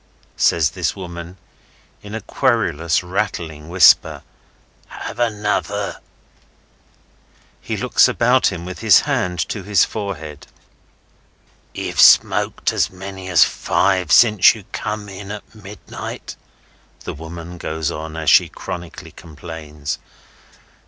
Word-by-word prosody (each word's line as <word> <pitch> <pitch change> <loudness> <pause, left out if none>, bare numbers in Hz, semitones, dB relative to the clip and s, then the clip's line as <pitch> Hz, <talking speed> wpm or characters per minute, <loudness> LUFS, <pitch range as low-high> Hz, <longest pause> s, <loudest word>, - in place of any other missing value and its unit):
says 80 -3 +2
this 90 -4 -2
woman, 85 -1 -8 0.6
in 105 +1 -8
a 110 - -4
querulous, 90 - 0
rattling 85 -5 -4
whisper. 95 +1 +5 0.6
"Have - - -8
another?" 110 -3 -1 1.6
He - - -4
looks - - +4
about 125 +2 +2
him, 85 -3 -4
with 95 0 -7
his - - +6
hand 90 -1 -1
to 105 - -4
his 100 -2 +3
forehead. 80 -9 -7 1.3
"Ye've - - -1
smoked - - +4
as - - +1
many 95 0 -8
as 90 -4 +6
five 95 -1 0
since 105 -3 +6
ye 105 -4 -12
come 105 -1 -4
in 100 0 -9
at 105 0 -9
midnight," 105 -2 -9 0.7
the - - -5
woman 85 +2 -9
goes 80 0 -3
on, 80 0 -7
as 80 -1 +2
she - - +5
chronically 85 -2 -8
complains. 75 -2 -8
90 Hz, 115 wpm, -19 LUFS, 80-105 Hz, 1.6 s, his